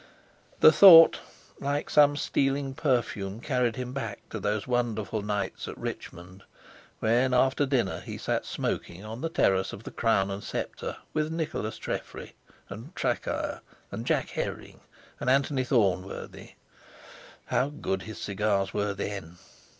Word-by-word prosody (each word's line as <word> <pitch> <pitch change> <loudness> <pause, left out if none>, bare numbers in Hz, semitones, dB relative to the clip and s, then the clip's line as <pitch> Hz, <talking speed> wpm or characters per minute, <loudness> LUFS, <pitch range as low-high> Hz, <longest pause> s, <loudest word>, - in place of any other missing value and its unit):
The 155 - +9
thought, 165 -2 +9 0.4
like 145 +1 -2
some 145 -1 +5
stealing 135 -1 0
perfume, 115 -8 -1
carried 125 -3 0
him 125 0 -5
back 115 -7 -5
to 110 - -4
those 105 +1 -1
wonderful 115 -4 -1
nights 105 -1 -3
at - - -7
Richmond 90 +3 -7 0.6
when 125 +3 +2
after 135 +3 +3
dinner 125 -8 0
he - - -7
sat - - -1
smoking 90 +4 -4
on 110 +3 -7
the 165 - -1
terrace 95 -11 +1
of 105 - -9
the - - -8
Crown 100 -4 +1
and 100 +1 -5
Sceptre - - -5 0.2
with 155 0 -1
Nicholas 160 -9 -3
Treffry - - -6 0.3
and 115 - -10
Traquair 125 -2 -2 0.3
and - - -6
Jack - - +1
Herring - - -5 0.4
and - - -1
Anthony 135 0 +2
Thornworthy. 95 -7 -1 0.9
How 125 +3 +1
good 95 -10 -3
his 110 +2 -8
cigars 100 -1 -1
were 105 -1 -1
then! 95 -4 -5
115 Hz, 140 wpm, -28 LUFS, 100-135 Hz, 0.9 s, The